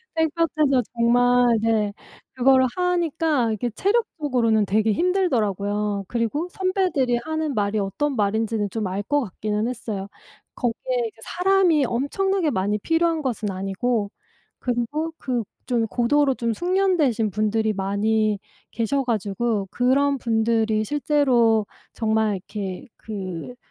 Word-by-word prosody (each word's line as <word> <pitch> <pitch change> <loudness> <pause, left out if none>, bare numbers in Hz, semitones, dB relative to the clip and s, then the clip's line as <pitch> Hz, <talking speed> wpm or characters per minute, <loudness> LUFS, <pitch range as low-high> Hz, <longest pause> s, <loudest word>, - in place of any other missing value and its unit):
땡볕에서 315 -4 +2
정말 245 0 +4
네 215 -2 +1 0.4
그거를 260 +1 +4
하니까 325 -8 +1
이게 220 +3 -2
체력적으로는 265 - +1
되게 215 +2 +2
힘들더라고요. 210 - 0
그리고 240 - -1
선배들이 365 -10 0
하는 315 -2 -2
말이 210 -1 0
어떤 260 +9 -1
말인지는 215 0 0
좀 210 0 -3
알 195 +2 -3
것 290 +7 +1
같기는 210 0 -2
했어요. 215 -5 -4 0.5
거기에 385 - -2
이제 440 - -13
사람이 360 -5 +2
엄청나게 340 +9 0
많이 205 -4 0
필요한 325 +5 +1
것은 230 -7 -2
아니고 200 +3 -1 0.5
그리고 255 +7 -2
그 245 -3 -2 0.2
좀 235 -3 +1
고도로 270 +4 +2
좀 235 -2 -1
숙련되신 345 - +1
분들이 215 +1 0
많이 210 +2 0 0.3
계셔 255 +4 -1
가지고 215 -2 -1
그런 275 +3 +2
분들이 225 -1 +1
실제로 250 -5 +2 0.3
정말 220 -2 +1
이렇게 190 +3 -6
그 195 0 -6
235 Hz, 290 characters per minute, -23 LUFS, 215-295 Hz, 0.5 s, 정말